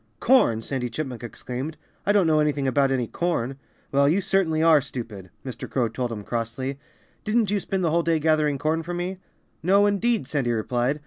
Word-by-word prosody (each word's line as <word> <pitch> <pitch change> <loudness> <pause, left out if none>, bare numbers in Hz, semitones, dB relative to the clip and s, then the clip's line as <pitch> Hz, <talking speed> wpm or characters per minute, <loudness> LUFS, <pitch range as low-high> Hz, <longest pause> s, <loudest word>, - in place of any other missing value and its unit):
"Corn!" 115 - +4
Sandy 125 -2 -2
Chipmunk 130 -4 -5
exclaimed. 125 +5 -6 0.3
"I - - +5
don't 205 -3 +4
know 155 -1 +3
anything 145 -2 +1
about 135 +1 +2
any 130 -2 +1
corn!" 135 -3 -2 0.3
"Well, 140 +1 +4
you 175 +6 +3
certainly 180 -5 +1
are 160 -3 +6
stupid!" 115 -8 -7 0.2
Mr. 125 -3 -6
Crow 120 -4 0
told 120 +1 -3
him 105 -3 -5
crossly. 120 +5 -3 0.4
"Didn't 215 -1 +1
you 205 - +2
spend 190 0 -2
the 165 - +2
whole 170 +1 +3
day 165 -1 +1
gathering 155 -2 +2
corn 155 +4 0
for 175 +2 -5
me?" 180 +2 -3 0.4
"No, 195 +4 +4
indeed!" 205 - +1
Sandy 135 -5 0
replied. 120 +5 0
145 Hz, 190 wpm, -24 LUFS, 125-175 Hz, 0.4 s, are